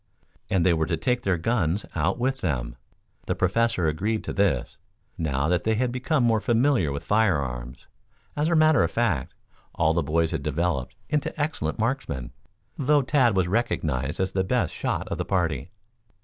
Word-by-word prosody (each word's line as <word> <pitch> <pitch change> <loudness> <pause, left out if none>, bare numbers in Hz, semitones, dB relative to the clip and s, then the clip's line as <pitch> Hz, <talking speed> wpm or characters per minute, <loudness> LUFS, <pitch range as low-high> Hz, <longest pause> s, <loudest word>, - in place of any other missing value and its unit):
And 90 -3 +2
they 90 - +5
were 80 -1 0
to 80 - 0
take 120 +10 0
their 95 -5 +1
guns 95 -1 0
out 80 -1 0
with 130 +2 -1
them. - - -2 0.5
The - - 0
Professor 95 -1 +1
agreed 105 +8 -1
to - - -4
this, 100 -2 0 0.4
now 70 -3 -1
that 90 0 +1
they 110 0 +1
had 125 +2 0
become 130 +3 0
more 115 -2 +3
familiar 120 - +2
with 70 - -4
firearms. 70 - 0 0.5
As 150 +2 +1
a 170 - +2
matter 155 -3 +5
of - - +1
fact, 95 - -1 0.4
all 80 0 +2
the 85 - +1
boys 80 +2 0
had 80 -4 -2
developed 75 -2 -1 0.2
into 150 +1 -1
excellent 145 - -2
marksmen, 110 - -2 0.5
though 145 +1 +3
Tad 130 -6 +3
was 90 -2 +2
recognized 75 - -1
as 95 0 0
the 95 0 0
best 95 - 0
shot - - -2
of - - -3
the - - 0
party. 85 -6 -1
95 Hz, 175 wpm, -25 LUFS, 80-120 Hz, 0.5 s, they